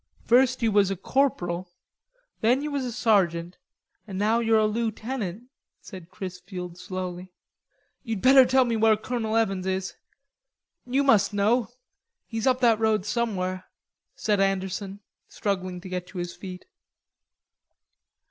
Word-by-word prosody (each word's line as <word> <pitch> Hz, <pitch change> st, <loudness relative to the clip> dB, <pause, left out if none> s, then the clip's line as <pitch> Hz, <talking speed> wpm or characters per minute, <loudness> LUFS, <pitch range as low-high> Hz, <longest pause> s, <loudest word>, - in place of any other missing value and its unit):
"First 255 Hz, +1 st, +3 dB
you 225 Hz, -, +3 dB
was 200 Hz, -2 st, +4 dB
a 195 Hz, -, -1 dB
corporal, 185 Hz, -7 st, -1 dB, 0.7 s
then 245 Hz, +5 st, +2 dB
you 300 Hz, -, -3 dB
was 280 Hz, -2 st, -2 dB
a 245 Hz, -, -3 dB
sergeant, 180 Hz, -7 st, +1 dB, 0.5 s
and 195 Hz, -3 st, -6 dB
now 215 Hz, +3 st, +2 dB
you're 225 Hz, -1 st, +3 dB
a 215 Hz, -, +3 dB
lootenant," 220 Hz, -1 st, -3 dB, 0.4 s
said 185 Hz, -4 st, -11 dB
Chrisfield 180 Hz, -1 st, -7 dB
slowly. 185 Hz, -1 st, -6 dB, 0.7 s
"You'ld 225 Hz, -5 st, -4 dB
better 265 Hz, +1 st, +8 dB
tell 260 Hz, 0 st, +3 dB
me 235 Hz, -1 st, 0 dB
where 220 Hz, -1 st, +4 dB
Colonel 225 Hz, -1 st, -2 dB
Evans 195 Hz, -4 st, 0 dB
is.... 190 Hz, 0 st, -2 dB, 0.9 s
You 265 Hz, +3 st, +1 dB
must 215 Hz, -6 st, +3 dB
know.... 215 Hz, +3 st, +2 dB, 0.6 s
He's 225 Hz, +1 st, -3 dB
up 255 Hz, 0 st, +2 dB
that 230 Hz, -3 st, +4 dB
road 215 Hz, -3 st, +1 dB
somewhere," 190 Hz, -5 st, -2 dB, 0.5 s
said 210 Hz, -2 st, 0 dB
Anderson, 195 Hz, +1 st, -1 dB, 0.3 s
struggling 185 Hz, -4 st, -3 dB
to 185 Hz, -, -9 dB
get 180 Hz, -1 st, -4 dB
to 190 Hz, -, -11 dB
his 175 Hz, -1 st, -4 dB
feet. 185 Hz, -2 st, -9 dB
210 Hz, 140 wpm, -26 LUFS, 185-235 Hz, 0.9 s, better